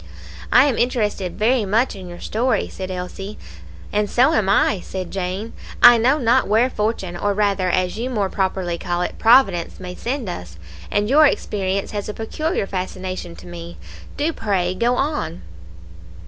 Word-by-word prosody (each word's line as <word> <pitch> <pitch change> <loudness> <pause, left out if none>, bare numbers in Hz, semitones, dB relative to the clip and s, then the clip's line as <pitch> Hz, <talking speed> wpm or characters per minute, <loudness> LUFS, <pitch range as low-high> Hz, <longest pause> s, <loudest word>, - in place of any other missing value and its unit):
"I 250 - +7
am 270 -5 0
interested 210 -7 -1
very 235 +2 +2
much 215 +6 +1
in 185 -2 -9
your 175 0 -9
story," 240 +2 0
said 190 -1 -6
Elsie. 185 +3 -6 0.6
"And 210 0 +1
so 250 +2 +4
am 205 -3 +1
I," 200 0 +3
said 185 0 -6
Jane. 195 +4 -4 0.3
"I 240 -1 +9
know 260 +6 +3
not 250 -1 +2
where 230 +5 +3
fortune, 210 -6 -2
or 200 +3 -1
rather, 200 -3 +1
as 185 +3 0
you 245 +2 -2
more 210 -6 0
properly 185 -3 -2
call 175 -1 -1
it, - - -5
Providence 220 -8 +4
may 180 -1 -7
send 245 +4 -4
us; 90 - -7 0.3
and 205 0 0
your 300 +5 +6
experience 195 -6 -2
has 205 0 -4
a 210 - -5
peculiar 310 - -2
fascination 185 - -5
to 85 +2 -13
me. 85 -1 -9 0.4
Do, 310 +3 0
pray, 185 -7 -1
go 235 +6 +1
on." 295 +4 -2
205 Hz, 170 wpm, -21 LUFS, 185-235 Hz, 0.6 s, I